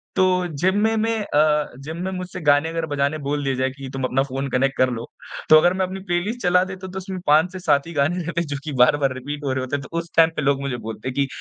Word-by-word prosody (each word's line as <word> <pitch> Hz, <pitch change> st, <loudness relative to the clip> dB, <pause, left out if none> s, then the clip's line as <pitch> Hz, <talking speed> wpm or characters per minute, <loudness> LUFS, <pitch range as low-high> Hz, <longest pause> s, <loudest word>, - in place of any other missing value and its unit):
तो 185 Hz, -1 st, +2 dB
जिम 190 Hz, +2 st, +2 dB
में 225 Hz, 0 st, +2 dB
मैं 225 Hz, 0 st, 0 dB
अ, 150 Hz, -3 st, +2 dB
जिम 160 Hz, +3 st, -6 dB
में 190 Hz, -, -2 dB
मुझसे 180 Hz, -1 st, -6 dB
गाने 145 Hz, +2 st, +4 dB
अगर 165 Hz, 0 st, -2 dB
बजाने 145 Hz, 0 st, -1 dB
बोल 145 Hz, 0 st, -1 dB
दिया 135 Hz, -1 st, 0 dB
जाए 130 Hz, +1 st, 0 dB
कि 135 Hz, 0 st, -9 dB
तुम 135 Hz, -1 st, -4 dB
अपना 130 Hz, +1 st, +1 dB
फ़ोन 135 Hz, 0 st, -4 dB
कनेक्ट 135 Hz, +1 st, +1 dB
कर 130 Hz, -, +3 dB
लो। 120 Hz, -1 st, -4 dB, 0.4 s
तो 155 Hz, -, +9 dB
अगर 175 Hz, +3 st, +4 dB
मैं 190 Hz, 0 st, 0 dB
अपनी 190 Hz, +1 st, -6 dB
प्लेलिस्ट 195 Hz, +8 st, -1 dB
चला 180 Hz, -1 st, +4 dB
देता 190 Hz, 0 st, -7 dB
तो 185 Hz, +1 st, -8 dB
उसमें 190 Hz, 0 st, -5 dB
5 155 Hz, +4 st, +4 dB
से 185 Hz, -, -7 dB
7 150 Hz, -4 st, +2 dB
ही 170 Hz, -, -7 dB
गाने 155 Hz, +5 st, 0 dB
रहते 170 Hz, +1 st, -2 dB
जो -, -, -2 dB
कि 155 Hz, -, -5 dB
बार-बार 135 Hz, +1 st, +4 dB
रिपीट 145 Hz, +3 st, -6 dB
हो 140 Hz, -, -1 dB
रहे 130 Hz, -, -1 dB
होते 130 Hz, +2 st, -2 dB
तो 140 Hz, -, -11 dB
उस 170 Hz, 0 st, -7 dB
टाइम 165 Hz, 0 st, +6 dB
पर 155 Hz, -, -1 dB
लोग 140 Hz, 0 st, +1 dB
मुझे 140 Hz, -3 st, -3 dB
बोलते 115 Hz, +3 st, -5 dB
कि 140 Hz, +2 st, 0 dB
150 Hz, 270 wpm, -22 LUFS, 140-180 Hz, 0.4 s, तो